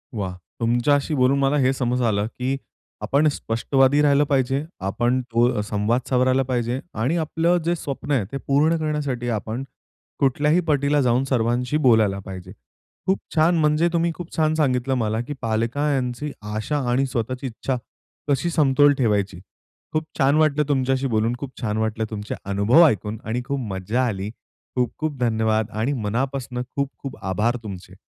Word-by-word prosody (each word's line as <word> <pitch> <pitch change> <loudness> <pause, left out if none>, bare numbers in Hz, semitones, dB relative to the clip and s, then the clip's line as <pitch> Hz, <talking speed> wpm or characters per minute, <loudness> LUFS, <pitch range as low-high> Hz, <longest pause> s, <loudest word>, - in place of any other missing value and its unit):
वाह! 95 -4 -3 0.3
तुमच्याशी 125 +6 +2
बोलून 130 +1 +3
मला 135 +1 +2
हे 130 -1 +3
समज 125 -1 -1
आलं, 105 -4 +1
की 130 +3 -3 0.4
आपण 145 +3 +2
स्पष्टवादी 135 +4 +2
राहिलं 145 -1 +4
पाहिजे, 135 0 +1 0.2
आपण 120 +7 0
तो 115 -1 +2
संवाद 105 +4 0
सावरायला 130 +1 +3
पाहिजे. 125 -1 -1
आणि 130 +10 0
आपलं 165 +2 +1
जे 170 +1 +2
स्वप्न 145 -2 -5
आहे, 125 -8 +2
ते 140 - -3
पूर्ण 150 +4 +3
करण्यासाठी 145 -6 -2
आपण 115 +3 -3 0.6
कुठल्याही 145 +5 +3
पटीला 145 -1 +2
जाऊन 125 0 +2
सर्वांशी 125 +3 +1
बोलायला 110 -8 +3
पाहिजे. 95 -2 -8 0.5
खूप 190 +1 +1 0.2
छान! 165 +2 +4
म्हणजे 155 +1 +3
तुम्ही 170 0 +2
खूप 175 -1 -8
छान 155 -1 +3
सांगितलं 135 -4 +1
मला, 110 -2 0
की 130 +5 -5
पालकांची 125 +4 -1 0.2
आशा 110 +8 -1
आणि 130 +3 +2
स्वतःची 130 +1 -3
इच्छा 130 +2 -3 0.5
कशी 145 +5 +1
समतोल 145 -2 +4
ठेवायची. 105 -6 0 0.5
खूप 155 0 +1
छान 140 0 +3
वाटलं 150 -1 +3
तुमच्याशी 135 -1 +1
बोलून, 115 -1 +1
खूप 140 -2 -6
छान 105 -3 -1
वाटलं 110 0 -1
तुमचे 105 -1 -5
अनुभव 100 - +5
ऐकून 105 - -1
आणि 115 +3 -2
खूप 140 +1 -2
मज्जा 105 +7 0
आली. 100 -2 -3 0.5
खूप-खूप 140 +4 -1
धन्यवाद 110 -2 +1
आणि 115 +6 0
मनापासून 125 +2 -2
खूप-खूप 135 +1 -5
आभार 105 +6 0
तुमचे. 95 -3 -8
130 Hz, 150 wpm, -23 LUFS, 110-145 Hz, 0.6 s, अनुभव